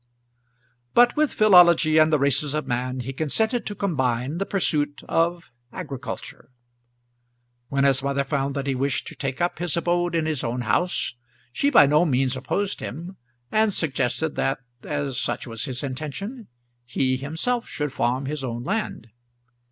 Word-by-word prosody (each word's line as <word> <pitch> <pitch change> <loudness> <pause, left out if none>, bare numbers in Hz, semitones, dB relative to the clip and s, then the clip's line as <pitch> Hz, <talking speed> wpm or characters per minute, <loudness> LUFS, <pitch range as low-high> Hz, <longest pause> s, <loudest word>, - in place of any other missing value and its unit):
But 240 0 +6
with 305 -1 +2
philology 170 -6 +6
and 155 0 +5
the 155 - +4
races 140 +1 +1
of 155 - -2
man 125 +1 -2
he 135 +2 -5
consented 220 - 0
to 205 - -3
combine 135 -6 -1
the 195 - -2
pursuit 150 -7 0
of 170 -3 0 0.2
agriculture. 140 -11 -7 1.2
When 140 0 +1
his 135 -1 +3
mother 140 0 0
found 140 0 -2
that 140 -1 -2
he 140 - 0
wished 135 +1 -1
to - - -10
take 135 -1 -4
up 175 -2 -1
his 175 -2 0
abode 175 0 0
in 160 -1 +1
his 155 -4 -1
own 120 +2 -2
house, 175 +6 0 0.4
she 280 - +2
by 235 - +7
no 150 +4 +4
means 135 -4 +1
opposed 195 +10 -2
him, 175 +7 -7 0.3
and 215 0 +3
suggested 155 -2 -1
that, 135 - +1 0.2
as 145 -3 -3
such 135 - -2
was 115 -3 -4
his 125 -1 -5
intention, 155 - -5 0.4
he 130 +2 0
himself 165 - -2
should 150 -2 -3
farm 130 +3 0
his 145 0 -4
own 120 -2 -4
land. 200 - -3
145 Hz, 160 wpm, -24 LUFS, 130-175 Hz, 1.2 s, by